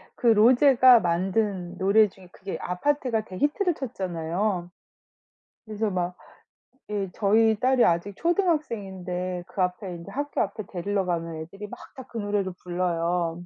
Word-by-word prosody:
그 240 - -1
로제가 245 +2 +7
만든 185 +1 -1
노래 205 +3 +4
중에 185 -1 -17
그게 190 +1 -6
아파트가 235 +4 0
대히트를 295 - 0
쳤잖아요. 180 - -3 1.0
그래서 215 -1 -2
막 180 -1 -2 0.7
예 200 -2 -2
저희 220 +1 +3
딸이 255 0 +3
아직 175 +4 0
초등학생인데 195 - -1
그 190 - -2
앞에 180 +1 -2
인제 170 -1 -9
학교 290 +2 -1
앞에 210 +2 -4
데리러 195 +1 -2
가면 165 -2 -2
애들이 180 +6 -8
막 - - -9 0.2
다 260 - -8
그 235 - -7
노래를 205 -2 -1
불러요. 175 -1 -1
195 Hz, 300 characters per minute, -26 LUFS, 180-225 Hz, 1.0 s, 로제가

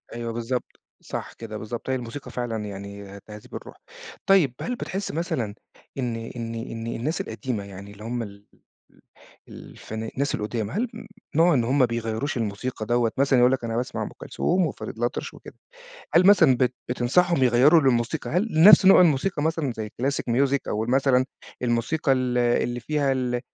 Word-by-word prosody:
أيوه 115 -1 -4
بالضبط، 120 +2 -4 0.2
صح - - -6
كده، 110 -2 -8
بالضبط. 115 +4 -6
هي - - +2
الموسيقى 125 +2 -7
فعلًا 115 -3 -3
يعني 100 0 -8
تهذيب 105 -1 -12
الروح. - - -8 0.5
طيب، 180 -10 +4
هل 250 - -3
بتحِس 195 -3 -4
مثلًا 125 - -2 0.4
إن 120 -3 -2
إن 115 0 -6
إن 115 0 -6
الناس 125 +7 -2
القديمة 115 -2 -4
يعني 100 0 -10
اللي 105 +1 -12
هُم 120 +1 -3
ال 100 -1 -10 0.4
ال - - -25 0.5
الفنا 110 +1 -8
الناس 140 +2 -1
القُدام 110 0 -3
هل 235 +7 -1 0.5
نوع 165 +1 +5
إن 120 -4 +2
هُم 130 +5 +1
ما 130 - +6
بيغيّروش 115 +3 -3
الموسيقى 110 +1 -3
دوّة، 120 0 +1
مثلًا 135 -1 +3
يقول 125 +1 +5
لك: 130 -2 -1
"أنا 115 -1 -2
باسمع 125 +1 -2
أم - - -4
كلثوم 180 0 0
وفريد 135 - -6
الأطرش 120 +1 -3
وكده."، - - -13 0.6
هل 175 +2 +6
مثلًا 165 -10 +6
بت 125 -1 +1
بتنصحهم 135 +6 +2
يغيّروا 130 +7 +6
للموسيقى 125 +3 0
هل 185 +8 +1
نفس 185 +4 +8
نوع 195 - +8
الموسيقى 160 0 +2
مثلًا 160 -4 0
زي 110 -1 -4
الclassic 125 0 -2
music 140 +1 +3
أو 110 +1 -1
ال 120 - -3
مثلًا 130 -1 +3 0.4
الموسيقى 125 +5 +1
ال 125 -1 0
اللي 120 0 +1
فيها 145 +1 0
ال 125 -2 -1
125 Hz, 175 wpm, -25 LUFS, 115-140 Hz, 0.6 s, نفس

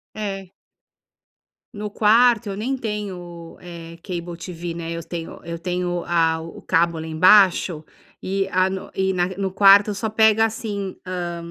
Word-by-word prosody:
É. 195 -3 -5 1.2
No 210 0 -6
quarto, 225 +1 +3
eu 195 - -5
nem 260 +5 -2
tenho, 185 -7 -6
eh, 170 -1 -10
cable 175 -2 -6
TV, 175 -1 -6
né, 170 0 -5
eu 170 - -4
tenho 165 0 -7
eu 170 0 -6
tenho 175 0 -3
a 165 -1 +1
o 165 +1 -9
o - - -15
cabo 165 0 +1
lá 160 - -6
embaixo 180 -1 +4 0.4
e 195 +1 -1
a 185 +1 +2
no 190 0 -6
e 190 0 +1
na 180 -1 0
no 195 -1 -1
quarto, 200 +2 +6
só 220 +2 -2
pega 220 0 +4
assim, 210 -4 -4
hã 175 -2 -4
185 Hz, 160 wpm, -22 LUFS, 170-205 Hz, 1.2 s, quarto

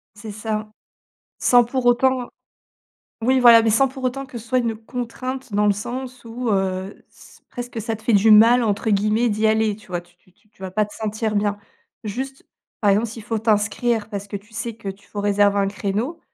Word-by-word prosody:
C'est 210 0 -8
ça. 215 0 -4 0.7
Sans 245 -1 +5
pour 245 +1 -3
autant 250 +1 +2 0.9
Oui 260 +3 +3
voilà, 235 -2 +8
mais 225 - +2
sans 270 +5 +3
pour 265 0 -9
autant 270 +2 -2
que 260 -2 -8
ce 230 - -12
soit 255 +1 +1
une 230 -3 -1
contrainte 250 +2 -6
dans 210 +1 +2
le 205 - +5
sens 245 +4 -6
où, 230 +1 -4
heu, 190 -1 -2
s - - -18
presque 245 -1 -6
ça 225 +1 -3
te 220 - -19
fait 225 +1 +1
du 205 +2 +5
«mal», 230 +3 +7
entre 210 0 0
guillemets, 215 +4 +2
d'y 215 0 +1
aller. 220 -1 +2
Tu 215 - -19
vois? 175 -1 -3
Tu 175 0 -25
tu 185 - -29
tu 215 - -34
tu 200 -2 -19
vas 190 - -5
pas 210 +3 +1
te 205 - -13
sentir 215 0 -3
bien. 205 0 0 0.5
Juste, 265 +6 -5 0.3
par 205 - +3
exemple, 210 +4 +2
s'il 225 +1 -9
faut 225 +1 -2
t'inscrire 215 +1 0
parce 205 -2 -6
que 200 - -4
tu 205 +3 -14
sais 230 0 -4
que 210 -3 -8
tu 195 +1 -9
faut 205 - -5
réserver 205 0 +2
un 200 - +2
créneau, 210 +11 -3
220 Hz, 215 wpm, -22 LUFS, 205-245 Hz, 0.9 s, voilà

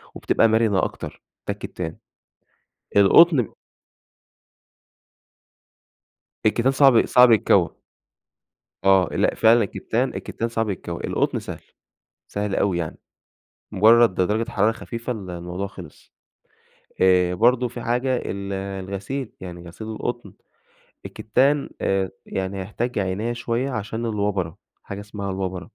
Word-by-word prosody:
وبتبقى 115 - +2
مرِنة 110 -3 +2
أكتر، - - -5 0.2
ده - - 0
الكتان. 80 -3 -6 1.0
القطن 125 - +6 3.0
الكتان 120 +5 +3
صعب 135 -4 +5
صعب 125 -1 +6
يتكوى. 110 - +3 1.1
آه، 95 -2 +5
لأ - - +1
فعلًا 115 0 +5
الكتان 120 +6 -2
الكتان 115 - -4
صعب 115 -2 -1
يتكوى، 85 -3 -5
القطن - - 0
سهل، - - -8 0.7
سهل 100 -1 -2
أوي 95 -3 +1
يعني. 80 -2 -4 0.7
مجرّد 110 +1 +5
د - - +1
درجة 110 +5 0
حرارة 105 +2 +2
خفيفة 115 +2 -6
ال 100 -5 -8
الموضوع 90 +3 -5
خلِص. 95 - -13 0.9
آآ، 90 -1 +4
برضه 125 +6 +3
في 120 0 -8
حاجة، 125 +2 0
ال 100 -3 -4
الغسيل، 100 +6 -5
يعني 85 -2 -9
غسيل 110 +6 -9
القطن، 120 -2 -5 0.7
الكتان 140 +6 +1
آآ، 95 -1 0 0.2
يعني 95 0 -3
هيحتاج 110 +5 -3
عناية 100 +5 -1
شوية 120 +3 -2
عشان 110 0 -4
الوبَرة. 100 -6 -2 0.2
حاجة 100 0 -7
إسمها 100 -1 -6
الوبَرة. 95 -2 -4
105 Hz, 115 wpm, -23 LUFS, 95-120 Hz, 3.0 s, القطن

